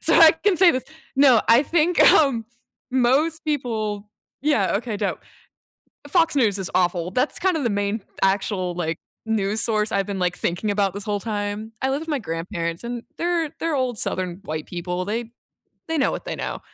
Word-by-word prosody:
So - - +2
I 325 -2 +9
can 360 +3 +1
say 370 -1 +7
this, 255 -1 -2 0.3
no, 265 -5 +6
I 235 +4 +7
think, 340 +3 +1
um, 265 -7 +3 0.5
most 275 +6 +2
people 220 -8 -2 0.3
yeah, 280 -11 +2
okay, 225 -1 -4
dope 200 -1 -2 0.9
Fox 330 -4 +2
News 215 -7 +2
is 190 - -4
awful, 180 -1 +1
that's 255 +6 0
kind 370 -3 +1
of 290 - -2
the 235 - +1
main 205 +1 -1 0.2
actual, 190 -2 0
like, 165 -2 -2 0.3
news 215 -1 0
source 215 -2 +1
I've 195 -1 +1
been 200 -1 -4
like 180 -1 0
thinking 185 +5 -1
about 200 -2 +1
this 200 - -5
whole 205 -1 -2
time. 210 0 -4
I 265 - +2
live 275 +2 -1
with 325 - -9
my 295 - 0
grandparents 170 -1 -4
and 240 0 -4 0.2
they're 340 -2 0
they're 330 -2 0
old 255 -5 -1
southern 185 0 -2
white 155 0 -4
people, 180 +1 -4
they 230 +2 -3 0.6
they 325 - 0
know 275 - +2
what - - -5
they - - -4
know, - - -4
220 Hz, 190 wpm, -23 LUFS, 195-280 Hz, 0.9 s, I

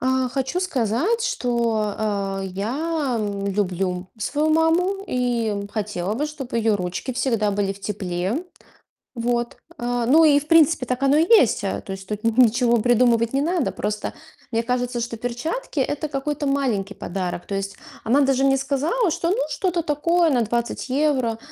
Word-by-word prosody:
А, 260 0 +1
хочу 265 +6 -2
сказать, 315 - 0
что, 230 - 0 0.5
э, - - -3
я, 260 - -2
м, 200 -1 -3
люблю 185 -2 -1
свою 295 +8 0
маму 350 +5 +2
и, 245 -2 0
м, 200 -1 -3
хотела 205 -2 -3
бы, 295 +6 -1
чтоб 285 -4 -8
её 225 -2 +2
ручки 180 +7 -4
всегда 230 -4 0
были 200 -1 0
в 200 - -15
тепле. 195 - -3 0.7
Вот. 240 0 -1 0.2
Э, 240 -1 -1
ну 320 +5 +6
и, 290 -2 +5
в 300 - -11
принципе, 320 -5 +4
так 250 +2 -2
оно 275 +1 +4
и 330 - +3
есть. 260 - +5
Э, 195 - -2
то 195 - -7
есть 190 0 -8
тут 210 0 -5
ни 230 - +4
ничего 240 +1 +2
придумывать 235 0 +3
не 275 - +2
надо. 340 -2 0
Просто 210 0 -3 0.4
мне 230 -1 0
кажется, 245 0 -1
что 230 -1 -5
перчатки- 245 - -3
это 290 +3 -1
какой-то 290 +1 -3
маленький 235 -8 0
подарок. 180 -1 -4
То 200 - -4
есть 195 +1 -3 0.3
она 260 +6 +3
даже 270 -1 +2
мне 270 0 +4
сказала, 295 - 0
что: 335 +1 -1
"Ну, 380 - +2
что-то 360 -5 -1
такое, 335 +3 +2
на 250 -4 +2
20 235 +4 -2
евро". 260 -4 +1
245 Hz, 175 wpm, -22 LUFS, 210-295 Hz, 0.7 s, ну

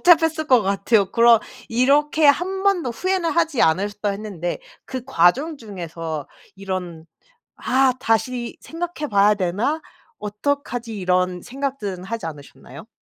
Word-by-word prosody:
복잡했을 320 -1 -1
것 255 -4 +5
같아요. 195 0 +1
그럼 235 -1 +6 0.3
이렇게 290 +6 +3
"1 370 +7 +2
번도 360 -10 +2
후회는 365 +6 -1
하지 325 -6 +1
않으셨다." 205 +5 +1
했는데 195 -4 -4 0.3
그 260 -2 -5
과정 270 - +2
중에서 165 - -6 0.3
이런 185 -4 -5 0.5
'아 260 0 +2
다시 235 +2 -1
생각해 330 -2 -5
봐야 205 +1 +5
되나? 205 - -1 0.4
어떡하지?' 230 +1 -3
이런 180 -1 0
생각들은 255 -9 -4
하지 225 -3 -4
않으셨나요? 145 -3 -11
225 Hz, 285 characters per minute, -22 LUFS, 190-285 Hz, 0.5 s, 그럼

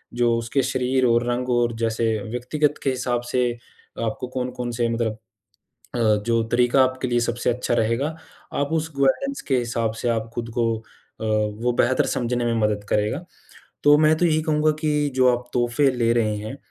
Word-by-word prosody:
जो 120 -1 +2
उसके 115 +4 0
शरीर 130 0 +1
और 120 0 +3
रंग 125 +1 -1
और 120 -1 +2
जैसे 115 0 0 0.3
व्यक्तिगत 145 +5 0
के - - +2
हिसाब 125 -2 -1
से 125 -1 +2 0.6
आपको 110 +3 -3
कौन-कौन 125 -1 -4
से 115 0 0
मतलब 115 -2 -1 0.8
अ, 120 - -1 0.3
जो 115 -1 +2
तरीका 125 +2 +4
आपके 130 0 -1
लिए 120 - +2
सबसे 120 +1 -1
अच्छा 120 0 -2
रहेगा, 115 +5 +1 0.5
आप 145 +2 -1
उस 160 0 -1
गवर्नेंस 275 - +1
के 130 - +3
हिसाब 115 -2 -1
से 120 - 0
आप 115 -1 -1
खुद 115 -1 -4
को 115 -1 +2
अ, - - -20 0.4
वो 110 +2 0
बेहतर 130 +1 +3
समझने 120 0 -1
में 120 - +1
मदद 105 -1 0
करेगा। 105 +11 0 0.6
तो 145 0 +7
मैं 155 0 +5
तो 175 - +2
यही 155 -2 +2
कहूँगा 155 0 +2
कि 150 -2 +1
जो 130 -1 +4
आप 125 0 -14
तोहफ़े 120 +3 +2
ले 115 -2 +1
रहे 110 -3 +1
हैं 110 +6 -6
120 Hz, 185 wpm, -23 LUFS, 115-130 Hz, 0.8 s, तो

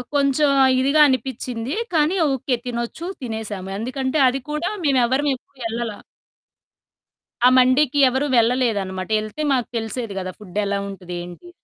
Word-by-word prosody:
కొంచెం 280 +1 +3 0.3
ఇదిగా 280 +4 +2
అనిపించింది. 255 -1 -2 0.2
కానీ, 315 +4 +2 0.2
ఓకే. 260 -1 -1
తినొచ్చు. 235 +7 -4 0.2
తినేసాము. 220 -5 -5
ఎందుకంటే 260 +5 -2
అది 265 +2 0
కూడా 300 +5 -1 0.2
మేమెవరం 265 +1 +2
ఎప్పుడు 260 +1 -21
వెళ్ళల. 230 0 -2 1.6
ఆ - - +8
మండికి 260 +3 +4
ఎవరు 265 +3 0
వెళ్ళలేదనమాట. 220 -6 +1
ఎళ్తే 215 +8 -6
మాకు 250 -3 0
తెలిసేది 225 -1 -4
కదా! 185 -1 -4
ఫుడ్డెలా 200 0 -2
ఉంటది 185 -2 -8
ఏంటి? 180 - -11
250 Hz, 125 wpm, -21 LUFS, 220-275 Hz, 1.6 s, ఆ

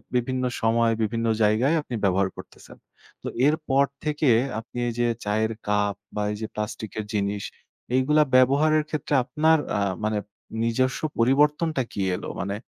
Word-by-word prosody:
বিভিন্ন 130 +1 0 0.2
সময়, 115 0 +3
বিভিন্ন 115 +2 -1 0.2
জায়গায় 115 +9 +3
আপনি 125 -5 -6
ব্যবহার 95 0 +2
করতেছেন। - - -13 0.5
তো - - -4 0.2
এরপর 150 -3 +2 0.2
থেকে 150 -2 +1 0.3
আপনি 115 +2 -11
এই 120 - -2
যে 120 - +3 0.2
চায়ের 110 +2 0 0.2
কাপ 105 -1 +1 0.2
বা 105 - -1
এই 105 - -4
যে 110 - -3
প্লাস্টিকের 105 0 -4
জিনিস, 100 0 -1 0.5
এইগুলা 150 +4 +4
ব্যবহারের 150 +4 +4
ক্ষেত্রে 150 -1 -3
আপনার 160 +4 +3 0.2
আ - - 0 0.3
মানে 110 -1 0 0.5
নিজস্ব 130 +3 +1 0.2
পরিবর্তনটা 150 +4 +3
কি 100 - -4
এল? - - -7 0.2
মানে 100 +2 -2
120 Hz, 145 wpm, -25 LUFS, 105-145 Hz, 0.5 s, এইগুলা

